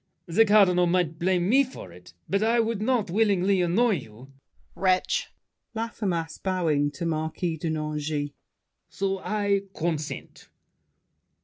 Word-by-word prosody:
The 200 Hz, +7 st, +4 dB
Cardinal 190 Hz, -4 st, +5 dB
might 170 Hz, -2 st, 0 dB
blame 180 Hz, 0 st, +1 dB
me 265 Hz, +6 st, +5 dB
for 250 Hz, -, -10 dB
it, 90 Hz, 0 st, -16 dB
but 200 Hz, +1 st, 0 dB
I 230 Hz, +2 st, +3 dB
would 225 Hz, -2 st, 0 dB
not 220 Hz, -5 st, 0 dB
willingly 200 Hz, -2 st, +2 dB
annoy 200 Hz, +5 st, +2 dB
you— 125 Hz, 0 st, -12 dB
DIDIER. 60 Hz, -, -35 dB
Wretch! 185 Hz, -1 st, +1 dB, 0.5 s
LAFFEMAS 195 Hz, -8 st, -3 dB
(bowing 165 Hz, -6 st, +1 dB
to 170 Hz, -, -5 dB
Marquis 160 Hz, +1 st, -2 dB
de 160 Hz, +2 st, -3 dB
Nangis). 150 Hz, -1 st, -2 dB, 0.6 s
So 195 Hz, 0 st, -2 dB
I 205 Hz, -1 st, 0 dB
consent. 160 Hz, -3 st, -4 dB
180 Hz, 130 wpm, -26 LUFS, 155-205 Hz, 0.6 s, Cardinal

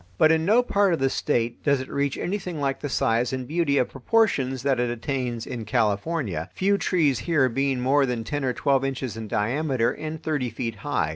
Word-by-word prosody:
But 160 Hz, -1 st, +5 dB
in 160 Hz, 0 st, +2 dB
no 225 Hz, +6 st, +4 dB
part 200 Hz, -5 st, +2 dB
of 165 Hz, -, -1 dB
the 135 Hz, 0 st, +1 dB
State 120 Hz, 0 st, -1 dB
does 140 Hz, -2 st, +3 dB
it 130 Hz, -, -5 dB
reach 140 Hz, 0 st, -1 dB
anything 180 Hz, -4 st, -3 dB
like 135 Hz, -1 st, -1 dB
the 145 Hz, -, -4 dB
size 120 Hz, -1 st, +1 dB
and 130 Hz, -1 st, -4 dB
beauty 155 Hz, -2 st, +1 dB
of 125 Hz, -, +2 dB
proportions 135 Hz, -, +1 dB
that 135 Hz, -3 st, +1 dB
it 120 Hz, 0 st, +1 dB
attains 120 Hz, -1 st, -3 dB
in 120 Hz, -3 st, -5 dB
California, 105 Hz, -, -1 dB
few 200 Hz, +1 st, +2 dB
trees 150 Hz, -, +2 dB
here 140 Hz, +2 st, +2 dB
being 135 Hz, +2 st, 0 dB
more 135 Hz, +2 st, +3 dB
than 120 Hz, -2 st, -2 dB
ten 145 Hz, +4 st, -3 dB
or 130 Hz, -, +1 dB
twelve 135 Hz, 0 st, +1 dB
inches 135 Hz, -3 st, -3 dB
in 110 Hz, -1 st, -6 dB
diameter 125 Hz, +4 st, 0 dB
and 155 Hz, 0 st, -6 dB
thirty 145 Hz, -6 st, -1 dB
feet 115 Hz, 0 st, -4 dB
high. 105 Hz, -, -1 dB
135 Hz, 210 wpm, -25 LUFS, 120-155 Hz, -, But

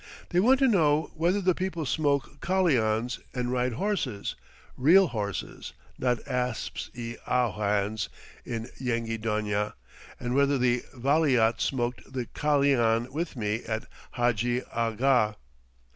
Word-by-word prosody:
They 175 Hz, -, +2 dB
want 250 Hz, +8 st, +5 dB
to 270 Hz, -, +6 dB
know 155 Hz, -, +3 dB
whether 175 Hz, +5 st, +1 dB
the 185 Hz, -1 st, +3 dB
people 180 Hz, -3 st, -3 dB
smoke 140 Hz, -1 st, 0 dB
kalians 125 Hz, -11 st, +1 dB, 0.2 s
and 125 Hz, -1 st, -1 dB
ride 125 Hz, -1 st, 0 dB
horses 130 Hz, -, -2 dB, 0.4 s
real 170 Hz, +7 st, +5 dB
horses, 105 Hz, -5 st, -4 dB, 0.3 s
not 125 Hz, -2 st, 0 dB
asps 125 Hz, -2 st, -2 dB
i 115 Hz, -1 st, -6 dB
awhans 105 Hz, -3 st, 0 dB, 0.3 s
in 115 Hz, 0 st, -5 dB
Yenghi 115 Hz, -3 st, -2 dB
Donia, 105 Hz, -1 st, -1 dB, 0.5 s
and 120 Hz, 0 st, -2 dB
whether 140 Hz, +1 st, +3 dB
the 125 Hz, -1 st, +2 dB
Valiat 130 Hz, -4 st, +3 dB
smoked 125 Hz, -1 st, -2 dB
the 125 Hz, -2 st, -2 dB
kalian 130 Hz, -5 st, +2 dB
with 160 Hz, +3 st, -3 dB
me 110 Hz, -1 st, -2 dB
at 110 Hz, +2 st, -3 dB, 0.3 s
Hadji 120 Hz, 0 st, +1 dB
Agha. 115 Hz, -1 st, +2 dB
125 Hz, 125 wpm, -28 LUFS, 115-145 Hz, 0.5 s, to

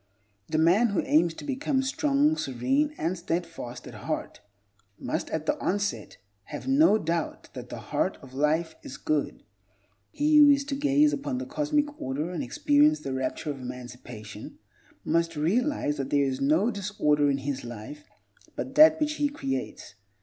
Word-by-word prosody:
The 155 Hz, -, -1 dB
man 175 Hz, +9 st, +4 dB
who 200 Hz, -4 st, 0 dB
aims 165 Hz, +2 st, +3 dB
to -, -, -9 dB
become 275 Hz, -1 st, 0 dB
strong, 285 Hz, +2 st, +2 dB
serene, 275 Hz, -, 0 dB
and 170 Hz, +3 st, -1 dB
steadfast 165 Hz, -8 st, -5 dB
at -, -, -10 dB
heart -, -, -5 dB, 0.6 s
must, -, -, -3 dB
at 160 Hz, -1 st, -3 dB
the -, -, +1 dB
onset, 200 Hz, +1 st, -2 dB, 0.3 s
have -, -, -8 dB
no 270 Hz, -4 st, +5 dB
doubt 165 Hz, -3 st, -3 dB
that -, -, -8 dB
the -, -, -6 dB
Heart -, -, -2 dB
of 130 Hz, -1 st, -13 dB
Life 155 Hz, +4 st, +1 dB
is 130 Hz, -, -9 dB
good. 155 Hz, -2 st, -2 dB, 0.7 s
He 300 Hz, +1 st, +2 dB
who 295 Hz, -1 st, +9 dB
is 280 Hz, 0 st, +4 dB
to 280 Hz, -1 st, -3 dB
gaze 290 Hz, +1 st, +3 dB
upon 275 Hz, -2 st, -3 dB
the 265 Hz, -, -4 dB
Cosmic 295 Hz, +1 st, -1 dB
Order 145 Hz, +6 st, -3 dB
and 180 Hz, -, -3 dB
experience 295 Hz, +1 st, +3 dB
the 135 Hz, -, -4 dB
rapture 130 Hz, +3 st, -2 dB
of 135 Hz, -2 st, -8 dB
emancipation 125 Hz, -4 st, -9 dB, 0.5 s
must 165 Hz, 0 st, +1 dB
realize 180 Hz, -, 0 dB
that 135 Hz, -1 st, -3 dB
there 140 Hz, -1 st, +3 dB
is 135 Hz, 0 st, -2 dB
no 160 Hz, -, +3 dB
disorder 165 Hz, -8 st, +1 dB
in 140 Hz, -, +1 dB
his 135 Hz, 0 st, -4 dB
life 120 Hz, +6 st, -9 dB, 0.5 s
but 265 Hz, -, -5 dB
that 310 Hz, +2 st, +7 dB
which 300 Hz, 0 st, -1 dB
he 290 Hz, -1 st, +1 dB
creates. 135 Hz, -, -5 dB
170 Hz, 165 wpm, -27 LUFS, -, 0.7 s, who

